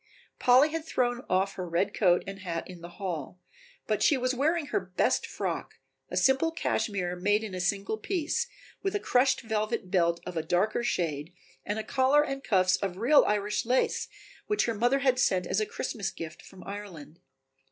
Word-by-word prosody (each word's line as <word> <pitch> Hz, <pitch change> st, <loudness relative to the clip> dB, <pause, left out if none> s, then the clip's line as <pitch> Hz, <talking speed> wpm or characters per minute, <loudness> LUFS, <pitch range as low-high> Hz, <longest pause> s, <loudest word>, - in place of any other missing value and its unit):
Polly 255 Hz, +4 st, +6 dB
had 325 Hz, 0 st, -3 dB
thrown 245 Hz, -5 st, 0 dB
off 190 Hz, +2 st, +1 dB
her 180 Hz, -2 st, -5 dB
red 190 Hz, +5 st, 0 dB
coat 180 Hz, -4 st, +3 dB
and 195 Hz, 0 st, -7 dB
hat 170 Hz, -3 st, -4 dB
in 180 Hz, -2 st, -11 dB
the 175 Hz, 0 st, -11 dB
hall, 180 Hz, -4 st, -5 dB, 0.5 s
but -, -, -1 dB
she 290 Hz, -, +4 dB
was 255 Hz, 0 st, 0 dB
wearing 305 Hz, +5 st, +1 dB
her -, -, +3 dB
best 185 Hz, -1 st, 0 dB
frock, -, -, -4 dB, 0.3 s
a -, -, -3 dB
simple 265 Hz, +5 st, +3 dB
cashmere 195 Hz, -, -1 dB
made 205 Hz, +4 st, +1 dB
in 210 Hz, -3 st, -6 dB
a 185 Hz, -, -4 dB
single 200 Hz, +4 st, -1 dB
piece, 375 Hz, -, -1 dB, 0.3 s
with 390 Hz, +1 st, -1 dB
a -, -, +1 dB
crushed 255 Hz, -6 st, +2 dB
velvet 215 Hz, -3 st, -2 dB
belt 170 Hz, -2 st, +2 dB
of -, -, -6 dB
a 160 Hz, -, 0 dB
darker 185 Hz, +8 st, 0 dB
shade 160 Hz, -7 st, -1 dB, 0.3 s
and 205 Hz, -, -3 dB
a 220 Hz, -, -2 dB
collar 265 Hz, +5 st, +3 dB
and 275 Hz, -1 st, -4 dB
cuffs 185 Hz, -2 st, +3 dB
of 190 Hz, -3 st, -3 dB
real 260 Hz, +8 st, +5 dB
Irish 210 Hz, 0 st, 0 dB
lace 250 Hz, +3 st, +1 dB, 0.4 s
which 420 Hz, 0 st, +1 dB
her 230 Hz, -, 0 dB
mother 245 Hz, +6 st, +2 dB
had 255 Hz, -1 st, +3 dB
sent 185 Hz, -6 st, +2 dB
as 190 Hz, -, 0 dB
a 215 Hz, -, 0 dB
Christmas 200 Hz, -5 st, -3 dB
gift 165 Hz, -1 st, -8 dB
from 185 Hz, -, -14 dB
Ireland. 180 Hz, -6 st, -9 dB
205 Hz, 190 wpm, -28 LUFS, 180-255 Hz, 0.5 s, Polly